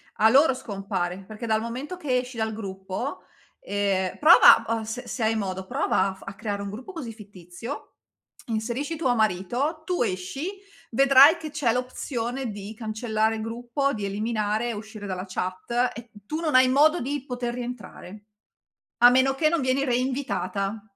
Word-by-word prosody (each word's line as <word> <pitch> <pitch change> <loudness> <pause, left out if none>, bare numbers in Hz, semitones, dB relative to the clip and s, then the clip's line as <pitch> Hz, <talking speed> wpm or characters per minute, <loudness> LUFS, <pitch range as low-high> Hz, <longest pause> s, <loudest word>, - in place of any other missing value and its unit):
A 220 +1 +5
loro 270 +2 +5
scompare, 195 -4 -4
perché 215 +2 -8
dal 220 -1 +2
momento 260 +10 -5
che 265 -7 0
esci 250 -1 -4
dal 220 0 -1
gruppo, 195 +4 -5 0.4
ehm 195 -2 -1
prova 325 +4 +8 0.2
o - - -6
s 225 +3 -5
se 235 - -4
hai 220 +1 +2
modo, 190 -3 -3
prova 190 - +1
a - - -5
f - - -20
a 195 - -6
creare 200 0 -4
un 200 - -4
gruppo 250 - -8
così 245 -9 -6
fittizio, 205 - -9 0.5
inserisci 235 +8 -2
tuo 265 -6 +1
marito, 235 - 0
tu 355 -8 0
esci, 205 - -3 0.4
vedrai 275 +5 +7
che 315 -2 -7
c'è 275 -6 +1
l'opzione 250 -1 -3
di 205 +1 -7
cancellare 220 0 -1
il 220 - -5
gruppo, 240 +5 -2
di 210 -3 -3
eliminare 215 +2 -1
e - - -2
uscire 215 0 -8
dalla 185 -1 -4
chat 185 +7 -1
e 230 -1 -10
tu 310 +6 -3
non 310 -5 -1
hai 255 0 +7
modo 305 +6 +4
di 280 +1 -3
poter 245 -2 -3
rientrare. 215 -4 -8 0.7
A 240 +1 +9
meno 260 +2 +3
che 310 +2 +3
non 335 -1 +1
vieni 260 +2 +1
reinvitata. 230 -6 -1
230 Hz, 170 wpm, -25 LUFS, 205-260 Hz, 0.7 s, A